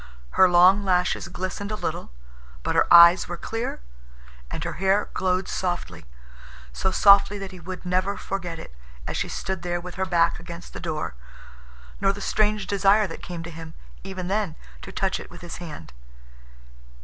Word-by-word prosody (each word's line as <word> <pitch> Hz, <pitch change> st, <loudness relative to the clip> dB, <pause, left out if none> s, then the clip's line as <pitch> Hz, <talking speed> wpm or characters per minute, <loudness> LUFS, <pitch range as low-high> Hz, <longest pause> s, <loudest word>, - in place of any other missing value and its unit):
Her 185 Hz, -, +5 dB
long 180 Hz, +3 st, +6 dB
lashes 180 Hz, -1 st, +1 dB
glistened 185 Hz, +3 st, -5 dB
a -, -, -1 dB
little. -, -, -4 dB, 0.5 s
But -, -, -1 dB
her -, -, +2 dB
eyes 170 Hz, +1 st, +8 dB
were 175 Hz, -, -5 dB
clear, 225 Hz, -, -4 dB, 0.7 s
and 155 Hz, -, -5 dB
her 170 Hz, 0 st, -3 dB
hair 195 Hz, +2 st, +2 dB
glowed 185 Hz, 0 st, 0 dB
softly, 90 Hz, -, -3 dB, 0.7 s
so 190 Hz, -, 0 dB
softly 200 Hz, +1 st, +5 dB
that 195 Hz, -1 st, -6 dB
he 185 Hz, -, -11 dB
would 185 Hz, +2 st, -8 dB
never 185 Hz, +2 st, 0 dB
forget 180 Hz, -4 st, -4 dB
it, 110 Hz, -, -10 dB, 0.3 s
as -, -, -4 dB
she -, -, -2 dB
stood 190 Hz, -2 st, -4 dB
there 175 Hz, 0 st, -2 dB
with 180 Hz, +2 st, -7 dB
her -, -, +2 dB
back 170 Hz, -2 st, +2 dB
against 170 Hz, +1 st, -10 dB
the -, -, -7 dB
door, 155 Hz, -, -3 dB, 0.9 s
nor 195 Hz, 0 st, +2 dB
the 200 Hz, -, -8 dB
strange 210 Hz, 0 st, +1 dB
desire 200 Hz, +2 st, +3 dB
that 165 Hz, -, -8 dB
came 175 Hz, -2 st, -6 dB
to 170 Hz, -, -8 dB
him—even 165 Hz, -, -9 dB
then—to 195 Hz, -2 st, -4 dB
touch 190 Hz, 0 st, -1 dB
it -, -, -10 dB
with 175 Hz, -, -12 dB
his 175 Hz, -1 st, -7 dB
hand. 150 Hz, -, -9 dB
185 Hz, 170 wpm, -24 LUFS, 170-195 Hz, 0.9 s, eyes